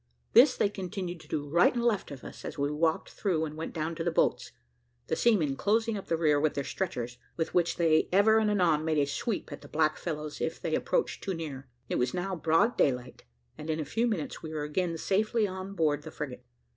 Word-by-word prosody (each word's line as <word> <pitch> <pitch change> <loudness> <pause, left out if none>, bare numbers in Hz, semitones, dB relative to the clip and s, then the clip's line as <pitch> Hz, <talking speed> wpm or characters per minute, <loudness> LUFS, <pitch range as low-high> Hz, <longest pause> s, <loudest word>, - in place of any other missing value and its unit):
This 255 +3 +7
they - - +3
continued 185 -3 -5
to - - -15
do, 145 -2 -3
right 170 +5 +5
and 240 - 0
left 215 -5 +1
of 140 -3 -9
us, - - -10
as 160 - -6
we 140 0 0
walked 160 +1 0
through 170 -6 0
and 155 -1 -7
went 160 +1 -5
down 160 0 -3
to 165 - -4
the 170 - +1
boats, 165 - +1 0.5
the - - -1
seamen 175 -13 +2
closing 225 +6 +1
up 200 - -6
the 165 - +1
rear 150 -3 +3
with 155 +1 +1
their 140 - -1
stretchers, 125 -9 -4 0.2
with 160 - -2
which 170 -1 +2
they 160 -2 +3
ever 210 +4 +5
and 215 -1 +2
anon 175 -7 +3
made 160 -1 0
a 145 - +3
sweep 190 - -3
at 145 - -7
the - - -12
black 155 0 +1
fellows 150 -3 -5
if - - -2
they - - -3
approached - - 0
too 190 -2 -2
near. 145 -5 -6 0.2
It - - -1
was 125 0 0
now 185 +1 -2
broad 170 +8 +2
daylight, 125 - 0 0.3
and 150 - -7
in 160 0 0
a 155 - -2
few 230 - 0
minutes 200 -10 -3
we 160 - -7
were 155 -1 -3
again 165 +3 -1
safely 215 +5 +1
on 190 +1 -6
board 150 -4 +1
the 155 - -8
frigate. 135 -5 -6
165 Hz, 235 wpm, -29 LUFS, 150-195 Hz, 0.5 s, This